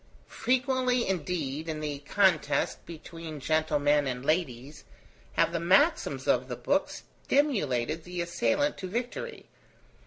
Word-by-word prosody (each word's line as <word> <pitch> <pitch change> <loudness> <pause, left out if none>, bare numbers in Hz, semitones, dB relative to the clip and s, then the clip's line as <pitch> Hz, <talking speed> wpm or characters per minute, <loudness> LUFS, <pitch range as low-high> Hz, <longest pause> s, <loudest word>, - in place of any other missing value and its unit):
Frequently 255 0 +1
indeed, 160 -4 -2
in 155 -1 -3
the 150 -2 -4
contest 155 -2 +1
between 165 -1 -8
gentlemen 150 -1 +2
and 125 0 -4
ladies, 145 -4 -1 0.5
have 165 - +2
the 170 - 0
maxims 190 - +2
of - - +2
the - - -4
Book - - 0
stimulated 160 - -1
the 180 +1 -6
assailant 230 +12 0
to 185 - -4
victory. 245 - -4
165 Hz, 120 wpm, -28 LUFS, 145-225 Hz, 0.5 s, gentlemen